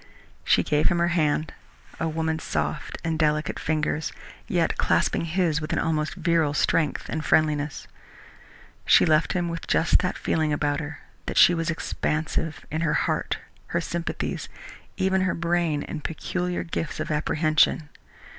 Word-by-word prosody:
She - - +3
gave 150 0 +2
him 175 - +1
her 170 0 +2
hand 155 -2 +1 0.5
a 165 - 0
woman's 160 0 -2
soft - - -2
and 165 -1 -1
delicate 155 -1 +1
fingers, 155 0 -1 0.4
yet - - +1
clasping - - +1
his 165 -2 +1
with 155 - -3
an - - 0
almost 155 -1 0
virile 165 -4 +1
strength 150 -1 +1
and 155 0 -3
friendliness. 150 -2 +1 1.0
She - - +7
left 155 -1 +3
him 175 -2 0
with 170 -1 -5
just 165 - +3
that 180 0 -1
feeling 155 -1 0
about 145 -1 0
her 155 0 -7 0.3
that - - -3
she 175 - +8
was 165 -1 -1
expansive, 160 -1 -2
in 155 +2 -1
her 165 -3 +1
heart, - - 0 0.3
her 170 - 0
sympathies, 170 0 -3 0.5
even 190 0 +2
her 185 0 +1
brain 170 -3 0
and 150 - -6
peculiar 180 +2 -2
gifts 165 -1 -4
of 155 - -3
apprehension. 155 0 +2
160 Hz, 155 wpm, -25 LUFS, 155-170 Hz, 1.0 s, she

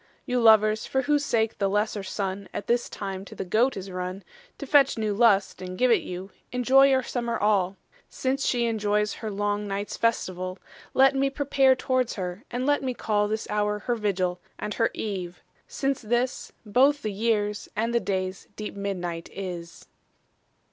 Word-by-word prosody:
You 250 -2 0
lovers, 220 -1 +5
for 265 0 0
whose 290 +1 +2
sake, 225 -4 0
the 200 -1 +2
lesser 210 +1 0
Sunne 195 0 -4
At - - -3
this 240 0 +1
time 195 -2 -5
to - - -11
the - - -4
Goat 225 +8 +2
is 190 0 -6
runne 185 +1 -4 0.3
To 280 - -6
fetch 275 -2 +4
new 215 -2 0
lust, 200 -4 +3
and 185 0 -6
give 250 +2 +3
it - - +4
you, 185 +2 -7 0.2
Enjoy 260 +2 +5
your 265 -1 +3
summer 235 -1 -2
all; 195 -2 +1 0.3
Since 270 +1 -1
shee 240 -1 +2
enjoyes 210 -2 +1
her 220 - -3
long 205 0 -1
nights 200 +1 -4
festivall, 185 -5 -1 0.4
Let 270 +1 +6
mee 275 0 +1
prepare 275 -1 +3
towards 255 -1 0
her, 185 +2 -5
and 245 +1 -2
let 290 +1 +2
mee 255 -2 -2
call 210 -2 +1
This 220 +1 -2
houre 210 0 0
her 240 - 0
Vigill, 185 -5 -1 0.2
and 210 - -4
her 230 - +2
Eve, 180 -5 -5 0.2
since 275 -1 -1
this 240 +3 -1
Bothe 270 +7 +3
the 215 - -2
yeares, 210 -1 0
and 230 +3 0
the 235 - +4
dayes 185 -3 -3
deep 210 -1 -6
midnight 180 -4 -4
is. 175 -3 -7
210 Hz, 180 wpm, -26 LUFS, 195-245 Hz, 0.4 s, Let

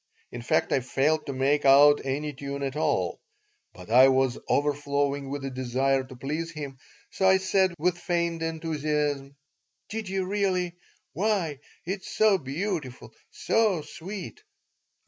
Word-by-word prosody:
In 120 - -6
fact, 115 - +1
I - - +3
failed 145 +5 0
to - - -2
make 140 +3 +1
out 145 +2 +6
any 145 +3 -2
tune 140 +1 -5
at 135 0 -3
all, 155 - 0 0.5
but - - -12
I 130 +3 +8
was 130 -1 +2
overflowing 145 -1 0
with 140 0 -4
a 135 - -4
desire 130 +1 0
to 130 0 -12
please 150 +6 -4
him, 140 -4 -7 0.3
so 190 - +1
I 190 - +6
said, 190 -1 +1
with 175 +2 0
feigned 170 -2 -1
enthusiasm: 150 -3 -2 0.5
"Did 220 -2 -4
you 190 -1 -1
really? 185 -3 0 0.4
Why, 185 -8 0 0.3
it's 190 +2 -4
so 215 -3 +4
beautiful, 140 - -4 0.2
so 210 -8 +1
sweet!" 185 - -8
150 Hz, 145 wpm, -27 LUFS, 135-180 Hz, 0.5 s, I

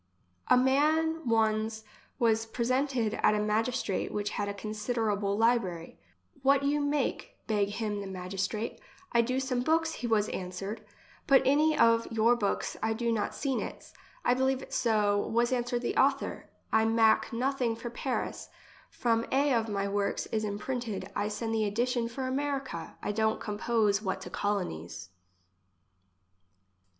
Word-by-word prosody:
A - - +6
man 310 +4 +2
one's 220 0 +1 0.3
was 225 -2 +2
presented 245 -1 0
at 210 - +4
a - - +1
magistrate 215 -1 0
which 205 0 -2
had 205 0 -2
a - - -3
considerable 210 -1 -1
library. 215 -8 0 0.2
" 90 - -31
What 275 +1 +4
you 290 +1 +2
make?" 285 -2 -1
beg 205 -2 +1
him 210 -1 -3
the 200 - -6
magistrate. 190 +4 -4 0.2
" 370 - -27
I 235 - +4
do 255 +3 0
some 260 -2 -1
books," 320 +3 +1
he 245 - -4
was 215 -2 +2
answered. 195 +4 -5 0.2
" - - -27
But 270 -1 +6
any 300 +3 +4
of 230 0 +4
your 225 +2 +4
books 205 -4 -1
I 220 0 +1
did 235 +1 0
not 215 -2 -2
seen 270 -3 -1
its. - - -7 0.2
— - - -28
I - - +5
believe 265 +1 +1
it - - -11
so, 210 -3 +2
was 235 +4 +1
answered 245 0 -1
the - - -1
author; 275 0 +1 0.2
I 220 0 +5
mak 225 0 +3
nothing 245 -1 0
for 235 +1 -6
Paris. 255 +1 -3 0.4
From 230 -1 0
a 280 +1 +3
of 225 -2 +1
my 200 -1 -1
works 200 0 -1
is 220 -1 0
imprinted, 210 -2 -4
I 205 - 0
send 225 +1 -3
the 220 -1 +1
edition 235 +3 0
for 260 +3 -4
America; 270 - -3
I - - -1
don't 220 +1 +1
compose 210 -1 +1
what 190 -2 -2
to - - -8
colonies." 90 - -3
225 Hz, 160 wpm, -30 LUFS, 210-255 Hz, 0.4 s, A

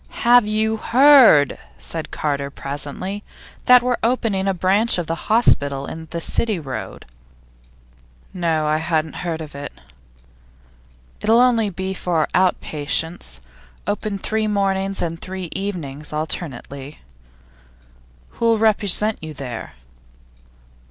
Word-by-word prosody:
'Have 240 -2 +6
you 220 +1 0
heard,' 250 - +6 0.2
said - - -5
Carter, 140 -2 -2
presently, 145 +9 -5 0.4
'that 250 -1 +8
we're 250 -1 +1
opening 225 -5 0
a 195 - +2
branch 195 +6 +2
of 175 - -2
the 165 0 -5
hospital 140 -11 +2
in 160 +2 -8
the 170 - -4
City 215 +5 0
Road?' 135 -5 -7 1.3
'No; 165 -4 0
I 155 0 +2
hadn't 160 -1 -1
heard 165 -2 -3
of 155 -2 -8
it.' 140 0 -8 1.4
'It'll 225 +1 +4
only 235 -4 +3
be 190 0 -4
for 170 -4 0
out 185 0 +3
patients. 150 - -3 0.4
Open 205 0 -2
three 215 +2 -1
mornings 195 -1 0
and 165 -1 -4
three 185 -2 -6
evenings 155 -8 -5
alternately.' 150 -2 -5 1.3
'Who'll 230 -1 +1
represent 215 -1 +2
you 155 -1 -8
there? 125 -4 -7
180 Hz, 120 wpm, -21 LUFS, 150-215 Hz, 1.4 s, that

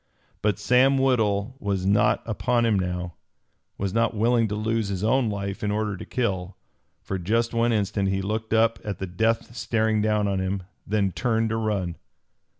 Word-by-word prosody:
But 105 -2 +1
Sam 125 +5 +4
Woodhull 120 -3 +1
was 100 -3 -2
not 105 +2 +3
upon 120 +2 +1
him 110 -4 +2
now, 90 -1 -3 0.6
was 95 -1 -2
not 115 0 +1
willing 115 +1 +3
to 105 - -3
lose 110 0 -1
his 100 -1 -3
own 120 +1 +2
life 100 -1 -4
in 105 - 0
order 105 -1 -1
to - - -8
kill. 95 -6 -2 0.5
For 95 - -3
just 115 +6 0
one 115 +1 +2
instant 100 -2 0
he 95 0 0
looked 110 +2 -3
up 115 0 +3
at 105 -2 -4
the 95 - -4
death 110 +6 -1
staring 110 -2 +1
down 105 -1 +1
on 100 -1 0
him, 95 0 -2 0.2
then 100 -2 +1
turned 115 +1 0
to 110 - -1
run. 100 -6 -1
105 Hz, 180 wpm, -25 LUFS, 100-115 Hz, 0.6 s, Sam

